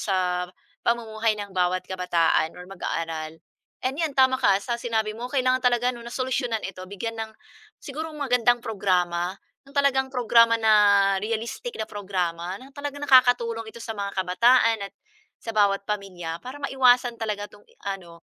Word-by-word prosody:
sa 180 Hz, -2 st, 0 dB, 0.4 s
pamumuhay 225 Hz, -2 st, 0 dB
ng 200 Hz, -1 st, -7 dB
bawat 180 Hz, 0 st, +1 dB
kabataan 170 Hz, -3 st, +1 dB
or 180 Hz, -, -9 dB
mag-aaral, 165 Hz, -4 st, -4 dB, 0.5 s
and 260 Hz, +1 st, 0 dB
‘yan 305 Hz, -4 st, -1 dB
tama 260 Hz, 0 st, +5 dB
ka 195 Hz, -, +4 dB
sa 235 Hz, -, -1 dB
sinabi 220 Hz, -2 st, -1 dB
mo, 245 Hz, +2 st, -5 dB
kailangan 255 Hz, -1 st, +2 dB
talaga 245 Hz, 0 st, +3 dB
'no 240 Hz, -, -10 dB
na -, -, -7 dB
solusyunan 255 Hz, -3 st, -1 dB
ito 185 Hz, -1 st, -6 dB
bigyan 225 Hz, +4 st, -5 dB
ng 220 Hz, 0 st, -5 dB, 0.5 s
siguro 310 Hz, +3 st, -6 dB
magandang 245 Hz, -4 st, +2 dB
programa, 180 Hz, -3 st, 0 dB, 0.3 s
ng 275 Hz, -, -17 dB
talagang 270 Hz, -2 st, +3 dB
programa 230 Hz, -1 st, +5 dB
na 220 Hz, -1 st, +5 dB, 0.5 s
realistic 230 Hz, -, -4 dB
na 220 Hz, -, -2 dB
programa. 185 Hz, -3 st, -3 dB
Na 270 Hz, +1 st, -13 dB
talagang 285 Hz, 0 st, -6 dB
nakakatulong 245 Hz, -4 st, +4 dB
ito 235 Hz, -, -12 dB
sa 225 Hz, -1 st, -5 dB
mga 200 Hz, 0 st, -3 dB
kabataan 225 Hz, +5 st, +3 dB
at -, -, -47 dB, 0.5 s
sa 230 Hz, -, -4 dB
bawat 200 Hz, -1 st, +3 dB
pamilya 180 Hz, -5 st, -4 dB
para 260 Hz, +3 st, -7 dB
maiwasan 250 Hz, -3 st, +3 dB
talaga 205 Hz, -2 st, -3 dB
'tong 205 Hz, -, -18 dB, 0.2 s
ano, 175 Hz, -4 st, -6 dB
220 Hz, 155 wpm, -25 LUFS, 185-250 Hz, 0.5 s, tama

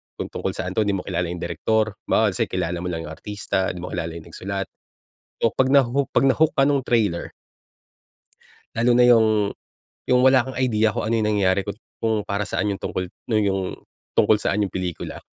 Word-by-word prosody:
kung -, -, -5 dB
tungkol -, -, -3 dB
saan 90 Hz, -, -3 dB
'to, 110 Hz, -, +3 dB
di 100 Hz, -, +2 dB
mo 95 Hz, -, -2 dB
kilala 90 Hz, -2 st, -2 dB
yung 85 Hz, 0 st, -5 dB
direktor, 105 Hz, +5 st, 0 dB
halimbawa, -, -, +3 dB
let's -, -, -5 dB
say, -, -, +3 dB
kilala 85 Hz, +1 st, -2 dB
mo 90 Hz, -, -4 dB
lang 85 Hz, -2 st, -3 dB
yung 75 Hz, -, -7 dB
artista, 100 Hz, +2 st, -2 dB
di 90 Hz, -, -8 dB
mo 90 Hz, -, -6 dB
kilala 85 Hz, -1 st, -3 dB
yung 85 Hz, 0 st, -10 dB
nagsulat. 95 Hz, +3 st, -4 dB, 0.7 s
So, 115 Hz, -, +4 dB
'pag 130 Hz, -, +2 dB
naho 135 Hz, 0 st, +3 dB
'pag -, -, +2 dB
na-hook 155 Hz, +4 st, +3 dB
ka 135 Hz, -, +4 dB
nung 140 Hz, -1 st, +2 dB
trailer 110 Hz, -8 st, 0 dB, 1.4 s
lalo 120 Hz, +2 st, +2 dB
na 125 Hz, -, +6 dB
yung 115 Hz, -2 st, +6 dB, 0.8 s
yung 125 Hz, 0 st, +5 dB
wala 130 Hz, -1 st, +5 dB
kang 130 Hz, -, -6 dB
idea 110 Hz, -4 st, +2 dB
kung -, -, -2 dB
ano -, -, +1 dB
yung 105 Hz, -, +1 dB
nangyari, 95 Hz, -1 st, +2 dB
kung 100 Hz, -, -4 dB, 0.3 s
kung 110 Hz, -1 st, +1 dB
para 100 Hz, +1 st, -2 dB
saan 105 Hz, 0 st, -1 dB
yung 100 Hz, -, -4 dB
tungkol 90 Hz, -1 st, -3 dB, 0.2 s
nung 110 Hz, -2 st, +2 dB
yung 95 Hz, -1 st, +1 dB, 0.6 s
tungkol 105 Hz, -1 st, +4 dB
saan 105 Hz, +1 st, 0 dB
yung -, -, -6 dB
pelikula. 90 Hz, -3 st, -4 dB
105 Hz, 210 wpm, -23 LUFS, 90-120 Hz, 1.4 s, na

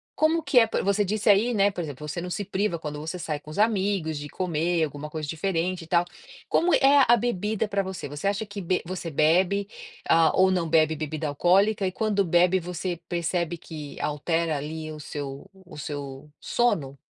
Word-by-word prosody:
como 320 Hz, +2 st, +2 dB
que 255 Hz, -, +5 dB
é 230 Hz, -, +6 dB
p -, -, -1 dB
você 200 Hz, +1 st, +2 dB
disse 215 Hz, +2 st, 0 dB
aí, 215 Hz, +4 st, +4 dB
né, 200 Hz, -1 st, +3 dB
por 180 Hz, -, -5 dB
exemplo, 150 Hz, 0 st, -7 dB
você 160 Hz, +3 st, -4 dB
não 180 Hz, -, -5 dB
se 200 Hz, +3 st, -3 dB
priva 190 Hz, -2 st, -1 dB
quando 150 Hz, -1 st, -6 dB
você 160 Hz, +4 st, -5 dB
sai 155 Hz, -3 st, -3 dB
com 150 Hz, -, -11 dB
os 155 Hz, -, -6 dB
amigos 195 Hz, -7 st, +1 dB
de 145 Hz, 0 st, -6 dB
comer 170 Hz, -1 st, 0 dB
alguma 145 Hz, +1 st, -7 dB
coisa 155 Hz, -1 st, -5 dB
diferente 175 Hz, +2 st, -1 dB
e -, -, -13 dB
tal. 170 Hz, +1 st, +2 dB, 0.4 s
Como 350 Hz, +1 st, +2 dB
é 275 Hz, 0 st, +6 dB
a 240 Hz, +1 st, +6 dB
bebida 215 Hz, -1 st, -1 dB
pra 200 Hz, -1 st, 0 dB
você? 190 Hz, -4 st, -6 dB
Você 145 Hz, +6 st, -4 dB
acha 205 Hz, +2 st, -2 dB
que 205 Hz, 0 st, -7 dB
be 185 Hz, 0 st, 0 dB
você 175 Hz, -1 st, -5 dB
bebe, 180 Hz, +7 st, +2 dB, 0.4 s
ah, 165 Hz, -1 st, +5 dB
ou 190 Hz, 0 st, +4 dB
não 175 Hz, -3 st, 0 dB
bebe 160 Hz, 0 st, +3 dB
bebida 155 Hz, 0 st, -3 dB
alcoólica, 195 Hz, +8 st, +2 dB
e 185 Hz, -, 0 dB
quando 205 Hz, 0 st, 0 dB
bebe, 180 Hz, +2 st, +3 dB
você 180 Hz, +1 st, -4 dB
percebe 170 Hz, 0 st, -1 dB
que 150 Hz, -3 st, -9 dB
altera 160 Hz, +2 st, -1 dB
ali 155 Hz, +2 st, -5 dB
o 155 Hz, -, -8 dB
seu 140 Hz, -1 st, -7 dB, 0.2 s
o 175 Hz, -, -12 dB
seu 145 Hz, -1 st, -6 dB
sono? 145 Hz, -, 0 dB
175 Hz, 205 wpm, -26 LUFS, 155-200 Hz, 0.4 s, é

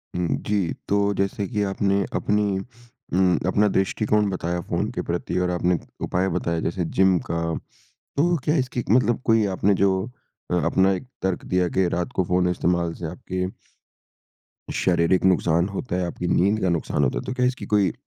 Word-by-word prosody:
उम, 90 Hz, -1 st, 0 dB, 0.2 s
जी। 100 Hz, -5 st, 0 dB
तो 100 Hz, 0 st, +2 dB
जैसे 100 Hz, +1 st, -1 dB
कि 105 Hz, -4 st, -2 dB
आपने 100 Hz, 0 st, +1 dB
अपनी 105 Hz, -2 st, +1 dB, 0.6 s
उम, 90 Hz, -2 st, +3 dB
अपना 105 Hz, +2 st, +3 dB
दृष्टिकोण 105 Hz, +2 st, +1 dB
बताया 90 Hz, -2 st, -2 dB
फ़ोन -, -, -2 dB
के -, -, -3 dB
प्रति -, -, -2 dB
और 90 Hz, 0 st, +1 dB
आपने 90 Hz, 0 st, +1 dB, 0.2 s
उपाय 90 Hz, +2 st, 0 dB
बताया 85 Hz, -2 st, -1 dB
जैसे 85 Hz, 0 st, -1 dB
जिम 95 Hz, -1 st, +5 dB
का 85 Hz, 0 st, -1 dB, 0.8 s
तो 175 Hz, +4 st, +3 dB
क्या 150 Hz, +1 st, +2 dB
इसकी 125 Hz, -2 st, -1 dB
मतलब 120 Hz, +1 st, +3 dB
कोई 115 Hz, -2 st, +4 dB
आपने 100 Hz, +2 st, +3 dB
जो 100 Hz, -, +5 dB, 0.6 s
अ, -, -, +2 dB
अपना 95 Hz, +1 st, +3 dB
एक 110 Hz, +7 st, -5 dB
तर्क 95 Hz, -1 st, -1 dB
दिया 90 Hz, -1 st, +1 dB
कि 95 Hz, -2 st, +4 dB
रात 90 Hz, 0 st, -2 dB
को 95 Hz, -, +2 dB
फ़ोन 90 Hz, +1 st, +1 dB
इस्तेमाल 85 Hz, -1 st, 0 dB
से 85 Hz, -, -7 dB
आपके 90 Hz, +2 st, -4 dB, 1.3 s
शारीरिक 90 Hz, 0 st, +2 dB
नुकसान 85 Hz, -1 st, +3 dB
होता 100 Hz, 0 st, -4 dB
है, 90 Hz, -1 st, 0 dB
आपकी 90 Hz, +1 st, -4 dB
नींद 100 Hz, +4 st, +2 dB
का 95 Hz, -, +2 dB
नुकसान 85 Hz, -3 st, 0 dB
होता 65 Hz, -3 st, +1 dB
है। -, -, -7 dB
तो 130 Hz, -, -3 dB
क्या 125 Hz, 0 st, +1 dB
इसकी 125 Hz, +1 st, -1 dB
कोई 100 Hz, -4 st, +4 dB
95 Hz, 180 wpm, -24 LUFS, 90-100 Hz, 1.3 s, जिम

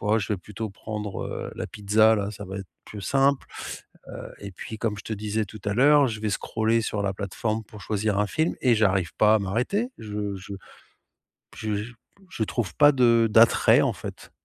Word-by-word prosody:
oh, 105 Hz, +2 st, +2 dB
je 105 Hz, +1 st, -2 dB
vais -, -, 0 dB
plutôt 105 Hz, +3 st, -6 dB
prendre, 105 Hz, 0 st, -5 dB
heu, -, -, -5 dB
la -, -, -4 dB
pizza-là, 105 Hz, 0 st, +2 dB
ça 105 Hz, -, -8 dB
va 95 Hz, +1 st, -6 dB
être 95 Hz, -, -7 dB, 0.2 s
plus 105 Hz, -, -9 dB
simple, 135 Hz, +2 st, +2 dB, 0.6 s
heu -, -, -8 dB
et 100 Hz, -, -7 dB
puis, 110 Hz, +4 st, -8 dB
comme 110 Hz, -3 st, -1 dB
je -, -, -10 dB
te 110 Hz, -, -5 dB
disais 105 Hz, +1 st, -2 dB
tout 110 Hz, +2 st, -11 dB
à 105 Hz, -, 0 dB
l'heure, 140 Hz, +2 st, +5 dB
je 110 Hz, -2 st, -5 dB
vais 110 Hz, -1 st, -1 dB
scroller 110 Hz, +3 st, 0 dB
sur 105 Hz, -1 st, -2 dB
la 100 Hz, -1 st, 0 dB
plateforme 110 Hz, +3 st, -3 dB
pour 105 Hz, -1 st, -13 dB
choisir 105 Hz, -1 st, -1 dB
un 105 Hz, -, +2 dB
film 160 Hz, +1 st, 0 dB
et 125 Hz, -3 st, +4 dB
j'arrive 95 Hz, -5 st, +1 dB
pas 110 Hz, 0 st, +5 dB
à -, -, +1 dB
m'arrêter. 125 Hz, -, -1 dB
Je 105 Hz, -2 st, -4 dB
je 95 Hz, +1 st, -8 dB
p -, -, -8 dB, 1.0 s
je 110 Hz, -1 st, -2 dB
j 110 Hz, +4 st, -5 dB, 0.4 s
je 110 Hz, -, -2 dB
trouve 110 Hz, -1 st, -3 dB
pas 145 Hz, -1 st, +7 dB
de 115 Hz, -4 st, +4 dB
d'attrait, 115 Hz, +1 st, +6 dB
en -, -, +1 dB
fait. -, -, -9 dB
110 Hz, 210 wpm, -25 LUFS, 100-115 Hz, 1.0 s, pas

